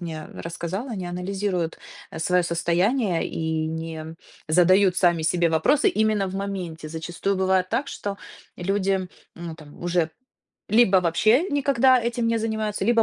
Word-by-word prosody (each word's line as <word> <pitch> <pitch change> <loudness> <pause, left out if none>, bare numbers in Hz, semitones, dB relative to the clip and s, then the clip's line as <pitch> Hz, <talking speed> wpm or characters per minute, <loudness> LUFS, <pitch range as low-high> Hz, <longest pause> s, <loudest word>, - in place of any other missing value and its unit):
мне 160 -3 -6
рассказала, 175 +8 -5
не 185 -2 -4
анализируют, 180 -1 -2 0.3
э, - - -7
своё 180 +2 +2
состояние 175 +4 +1
и 160 -1 -2
не 160 0 -5 0.3
задают 180 +3 +4
сами 170 -3 +3
себе 170 +1 +2
вопросы 220 - +3
именно 215 - +1
в 185 - -6
моменте. 185 -5 -5
Зачастую 175 +4 -3
бывает 190 -1 +2
так, 260 +5 0
что 200 -1 -5 0.4
люди, 195 0 0 0.3
ну, 170 -1 -6
там 150 -2 -15
уже 175 -2 0 0.6
либо 210 -3 +5
вообще 215 - +3
никогда 270 -3 +3
этим 235 0 -1
не 230 0 +1
занимаются, 220 -1 -2
либо 230 -1 +4
185 Hz, 145 wpm, -24 LUFS, 165-215 Hz, 0.6 s, либо